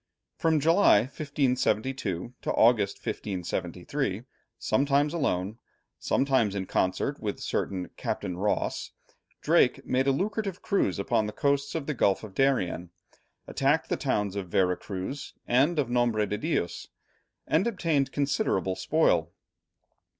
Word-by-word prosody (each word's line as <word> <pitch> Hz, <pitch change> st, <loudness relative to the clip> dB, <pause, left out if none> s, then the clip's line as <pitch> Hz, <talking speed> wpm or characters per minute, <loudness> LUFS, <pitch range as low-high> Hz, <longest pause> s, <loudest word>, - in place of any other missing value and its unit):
From 160 Hz, -2 st, +2 dB
July, 165 Hz, -, +5 dB
1572, 125 Hz, -, -1 dB
to -, -, -1 dB
August, 110 Hz, -4 st, +4 dB
1573, 95 Hz, -, -3 dB, 0.3 s
sometimes 140 Hz, +5 st, +1 dB
alone, 110 Hz, -, -1 dB, 0.4 s
sometimes 130 Hz, -7 st, +1 dB
in 95 Hz, -1 st, -2 dB
concert 95 Hz, +11 st, -1 dB
with 105 Hz, -2 st, -3 dB
a -, -, -14 dB
certain 95 Hz, -2 st, -2 dB
Captain 95 Hz, -3 st, -3 dB
Rawse, 100 Hz, +4 st, -1 dB, 0.5 s
Drake -, -, +3 dB
made 130 Hz, +1 st, +1 dB
a -, -, +5 dB
lucrative 195 Hz, +4 st, -2 dB
cruise 195 Hz, -, +1 dB
upon 100 Hz, +2 st, 0 dB
the -, -, -4 dB
coasts 140 Hz, +4 st, 0 dB
of 160 Hz, -4 st, -2 dB
the 150 Hz, -, -2 dB
Gulf 100 Hz, -6 st, +1 dB
of 105 Hz, -3 st, -9 dB
Darien, 95 Hz, -9 st, +1 dB, 0.6 s
attacked 140 Hz, +4 st, +1 dB
the -, -, +1 dB
towns 105 Hz, -8 st, -1 dB
of 95 Hz, -3 st, -4 dB
Vera 90 Hz, 0 st, +2 dB
Cruz 100 Hz, +10 st, -6 dB
and 140 Hz, +8 st, +3 dB
of 145 Hz, -4 st, +1 dB
Nombre 120 Hz, -3 st, +2 dB
de 105 Hz, +1 st, -3 dB
Dios, 150 Hz, -, -2 dB, 0.6 s
and 165 Hz, +8 st, +2 dB
obtained 160 Hz, -, 0 dB
considerable 135 Hz, -10 st, 0 dB
spoil. -, -, +2 dB
125 Hz, 130 wpm, -28 LUFS, 100-145 Hz, 0.6 s, July